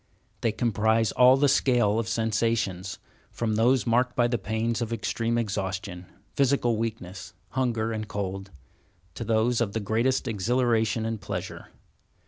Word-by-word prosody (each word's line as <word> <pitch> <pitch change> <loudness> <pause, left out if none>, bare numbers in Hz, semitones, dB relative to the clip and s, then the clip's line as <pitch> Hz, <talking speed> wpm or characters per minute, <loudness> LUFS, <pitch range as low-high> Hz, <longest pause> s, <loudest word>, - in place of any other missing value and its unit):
They 115 - +1
comprise 110 -1 +1
all 125 +1 +6
the 145 +1 +3
scale 120 -5 +3
of 115 - -2
sensations, 110 -5 -1 0.3
from 115 -2 -2
those 120 +4 +3
marked 125 +2 +1
by 120 -1 +3
the 120 -1 -1
pains 110 +3 -2
of 115 -1 -3
extreme 115 0 -1
exhaustion, 95 -4 -3 0.3
physical 135 -4 +2
weakness, 105 -4 -5
hunger, 115 -4 -1
and 110 -1 -4
cold, 95 -2 -4 0.6
to - - -5
those 115 +2 +1
of 105 -4 -1
the 110 - -1
greatest 115 +6 0
exhilaration 115 0 +1
and 115 -2 -3
pleasure. 95 -2 -6
115 Hz, 140 wpm, -26 LUFS, 105-120 Hz, 0.6 s, all